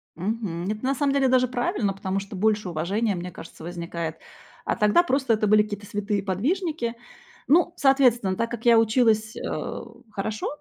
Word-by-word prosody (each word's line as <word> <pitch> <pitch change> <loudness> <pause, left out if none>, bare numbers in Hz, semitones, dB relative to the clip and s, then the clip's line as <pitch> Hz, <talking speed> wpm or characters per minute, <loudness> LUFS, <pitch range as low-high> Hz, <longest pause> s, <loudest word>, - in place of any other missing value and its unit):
Мгм. 190 -1 -3
Это 215 +3 -6
на 270 +1 +1
самом 280 +1 +1
деле 275 -1 +3
даже 255 0 +3
правильно, 240 -5 -1
потому 195 0 -2
что 195 0 -8
больше 210 -1 +1
уважения, 195 +6 -1
мне 180 +1 -5
кажется, 165 -1 -11
возникает. 170 -2 -5 0.5
А - - -1
тогда 210 +12 +4
просто 270 -7 +1
это 215 0 +1
были 215 +1 +6
какие-то 205 -1 -7
святые 205 0 -2
подвижники. 245 - -1 0.5
Ну, 345 +3 +4
соответственно, 250 - +3
так 230 +3 -1
как 235 0 -7
я 230 -1 +7
училась, 220 -1 +2
э, - - -4 0.3
хорошо 215 +1 -3
215 Hz, 170 wpm, -25 LUFS, 195-245 Hz, 0.5 s, я